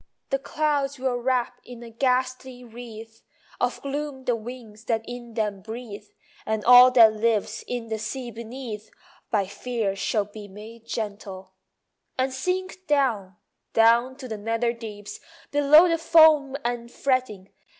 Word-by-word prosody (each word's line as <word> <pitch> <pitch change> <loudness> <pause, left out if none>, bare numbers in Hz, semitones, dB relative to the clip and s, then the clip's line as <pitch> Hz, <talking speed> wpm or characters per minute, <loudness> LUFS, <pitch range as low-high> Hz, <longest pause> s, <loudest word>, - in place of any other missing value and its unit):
The 275 - +1
clouds 285 -1 -1
will 255 -1 -1
wrap 245 0 -1
in 240 -1 -11
a 230 - -11
ghastly 255 +1 -1
wreath 225 -1 -11 0.4
Of - - -1
gloom 280 -1 -4
the 245 -2 +1
winds 225 -1 -10
that 225 -1 0
in 240 -2 -8
them 210 -3 -2
breathe, 220 -1 -8 0.4
And 220 -1 -2
all 250 +1 +9
that 225 -3 +7
lives 220 -1 -1
in 240 -2 -4
the 220 -1 -3
sea 240 +3 -5
beneath 225 -1 -8 0.4
By 205 -3 +1
fear 200 0 -3
shall 205 +1 0
be 205 0 -11
made 220 +3 -12
gentle; 200 -4 -6 0.6
And 260 0 0
sink 370 +6 -3
down, 235 -11 +1 0.4
down 235 +3 +4
to 260 -1 -9
the 220 -3 -5
nether 230 +2 -1
deeps, 210 -3 -9 0.3
Below 290 +4 +6
the 330 -1 +1
foam 315 -4 +5
and 240 -1 -3
fretting. 250 -9 -1
235 Hz, 145 wpm, -25 LUFS, 220-260 Hz, 0.6 s, all